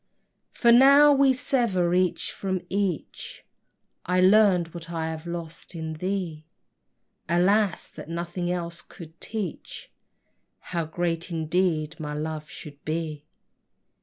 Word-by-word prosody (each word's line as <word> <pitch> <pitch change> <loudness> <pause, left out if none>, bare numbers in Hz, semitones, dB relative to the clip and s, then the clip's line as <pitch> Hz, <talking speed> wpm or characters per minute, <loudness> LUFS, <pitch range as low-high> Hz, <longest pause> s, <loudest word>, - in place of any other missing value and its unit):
For 235 - +3
now 280 +4 +8
we 275 -1 +5
sever 235 - +1
each 180 -1 +1
from 190 -2 -3
each, 195 -4 -3 0.6
I 180 +1 +1
learned 185 -3 +5
what 170 -1 -8
I 160 -1 -3
have 160 +1 -7
lost 170 0 -7
in 160 -1 -4
thee; 170 -2 -4 0.8
Alas, 185 +2 +2
that - - -10
nothing 175 +1 -3
else 170 -2 -4
could 165 -1 -14
teach 210 -7 -6 0.8
How 170 -2 0
great 165 +1 -2
indeed 165 -1 -1
my 150 -1 -4
love 155 0 -4
should 145 -3 -11
be! 155 -2 -4
175 Hz, 120 wpm, -26 LUFS, 160-190 Hz, 0.8 s, now